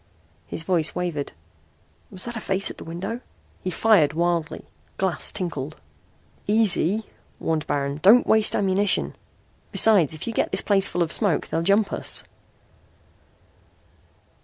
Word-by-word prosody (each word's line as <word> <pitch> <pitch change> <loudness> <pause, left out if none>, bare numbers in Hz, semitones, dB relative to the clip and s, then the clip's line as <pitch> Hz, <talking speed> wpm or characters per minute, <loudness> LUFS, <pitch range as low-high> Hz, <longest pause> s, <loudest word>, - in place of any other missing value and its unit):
his 160 - -6
voice 165 -3 0
wavered. 170 -5 -3 0.8
"Was 185 - -2
that 240 0 -6
a - - -3
face 195 -2 0
at - - -12
the - - -8
window?" 195 +9 -5 0.4
He 185 - -2
fired 180 -6 +3
wildly. 170 -1 -1 0.3
Glass 190 -3 0
tinkled. 160 -7 -5 0.7
"Easy," 210 -1 +2 0.3
warned 160 -1 -2
Baron. 140 0 -2
"Don't 225 +6 +6
waste 220 -1 +3
ammunition. 195 0 +1 0.6
Besides, 190 -9 +4
if 155 - -8
you 230 - -4
get - - 0
this - - -1
place 195 -2 +2
full 175 - 0
of 165 - -3
smoke 200 -6 +1
they'll 165 - -1
jump 200 +4 +2
us." - - 0
185 Hz, 135 wpm, -23 LUFS, 165-205 Hz, 0.8 s, Don't